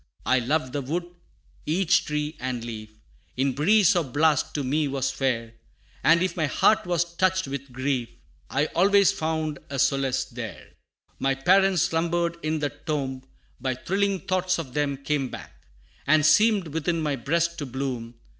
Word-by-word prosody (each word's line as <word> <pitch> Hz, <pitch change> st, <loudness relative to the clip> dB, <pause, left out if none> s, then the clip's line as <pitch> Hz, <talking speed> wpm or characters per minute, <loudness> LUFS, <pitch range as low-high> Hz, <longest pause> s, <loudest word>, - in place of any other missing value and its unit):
I 130 Hz, -, +3 dB
loved 130 Hz, +1 st, -1 dB
the 145 Hz, -, -1 dB
wood 165 Hz, +7 st, -3 dB, 0.6 s
each 175 Hz, +2 st, +2 dB
tree 150 Hz, +1 st, -2 dB
and 125 Hz, -2 st, -3 dB
leaf, 110 Hz, -2 st, -7 dB, 0.5 s
In 135 Hz, +1 st, +1 dB
breeze 185 Hz, -, +4 dB
or 175 Hz, -, +2 dB
blast, 150 Hz, +3 st, +1 dB
to 145 Hz, -, -1 dB
me 145 Hz, +3 st, 0 dB
was 135 Hz, -1 st, -1 dB
fair, 115 Hz, -4 st, -2 dB, 0.5 s
And 170 Hz, +2 st, +5 dB
if 185 Hz, -1 st, -1 dB
my 160 Hz, -4 st, 0 dB
heart 215 Hz, +6 st, +3 dB
was 175 Hz, -1 st, +2 dB
touched 185 Hz, 0 st, 0 dB
with 140 Hz, -1 st, -6 dB
grief, 130 Hz, -1 st, -2 dB, 0.4 s
I 140 Hz, -, +1 dB
always 200 Hz, +2 st, +5 dB
found 155 Hz, -2 st, -2 dB
a 140 Hz, -, -4 dB
solace 135 Hz, -1 st, +1 dB
there. -, -, -8 dB, 0.5 s
My 135 Hz, 0 st, +1 dB
parents 185 Hz, +5 st, +4 dB
slumbered 170 Hz, +1 st, 0 dB
in 155 Hz, +1 st, -1 dB
the 145 Hz, -1 st, -1 dB
tomb; 135 Hz, -5 st, -4 dB, 0.4 s
But 130 Hz, -1 st, -4 dB
thrilling 195 Hz, 0 st, 0 dB
thoughts 185 Hz, 0 st, 0 dB
of 145 Hz, -7 st, -6 dB
them 145 Hz, -1 st, 0 dB
came 140 Hz, -1 st, -1 dB
back, -, -, -11 dB, 0.4 s
And 155 Hz, +1 st, +4 dB
seemed 205 Hz, +1 st, +4 dB
within 165 Hz, +2 st, -1 dB
my 150 Hz, -3 st, -1 dB
breast 170 Hz, +4 st, -1 dB
to 145 Hz, -, -4 dB
bloom. 125 Hz, -3 st, -4 dB
150 Hz, 165 wpm, -25 LUFS, 135-170 Hz, 0.6 s, And